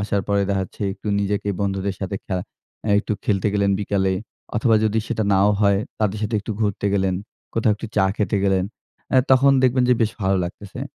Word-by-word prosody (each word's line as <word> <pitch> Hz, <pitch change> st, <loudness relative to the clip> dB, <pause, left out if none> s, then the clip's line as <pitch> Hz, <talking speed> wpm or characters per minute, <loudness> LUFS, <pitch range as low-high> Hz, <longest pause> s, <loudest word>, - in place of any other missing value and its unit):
আসার 100 Hz, -1 st, 0 dB
পরে 100 Hz, 0 st, +2 dB
দেখাচ্ছে 95 Hz, +1 st, -3 dB
একটু 95 Hz, +2 st, -13 dB
নিজেকে 100 Hz, 0 st, -1 dB
বন্ধুদের 95 Hz, -1 st, -1 dB
সাথে 100 Hz, 0 st, -3 dB
খ্যা 95 Hz, -, -2 dB, 0.5 s
এ -, -, +2 dB
একটু 105 Hz, -, -2 dB
খেলতে 105 Hz, 0 st, +1 dB
গেলেন 100 Hz, -1 st, +2 dB
বিকালে 95 Hz, -2 st, +1 dB, 0.4 s
অথবা 115 Hz, +1 st, +3 dB
যদি 110 Hz, +1 st, +1 dB
সেটা 110 Hz, -2 st, -1 dB
নাও 100 Hz, +2 st, +4 dB
হয় 100 Hz, -1 st, +4 dB, 0.2 s
তাদের 105 Hz, -1 st, 0 dB
সাথে 110 Hz, +1 st, -1 dB
একটু 110 Hz, -, -4 dB
ঘুরতে 100 Hz, -1 st, 0 dB
গেলেন, 95 Hz, -2 st, +1 dB, 0.4 s
কোথাও 110 Hz, -1 st, +3 dB
একটু 110 Hz, -, -7 dB
চা 95 Hz, -, +4 dB
খেতে 105 Hz, 0 st, 0 dB
গেলেন, 95 Hz, -2 st, +2 dB, 0.5 s
এ্যা 130 Hz, -1 st, +5 dB
তখন 135 Hz, +1 st, +6 dB
দেখবেন 130 Hz, 0 st, +3 dB
যে 125 Hz, -, +6 dB
বেশ 110 Hz, -, +1 dB
ভালো 95 Hz, 0 st, +2 dB
লাগতেছে। 95 Hz, +3 st, -8 dB
100 Hz, 190 wpm, -22 LUFS, 95-110 Hz, 0.5 s, তখন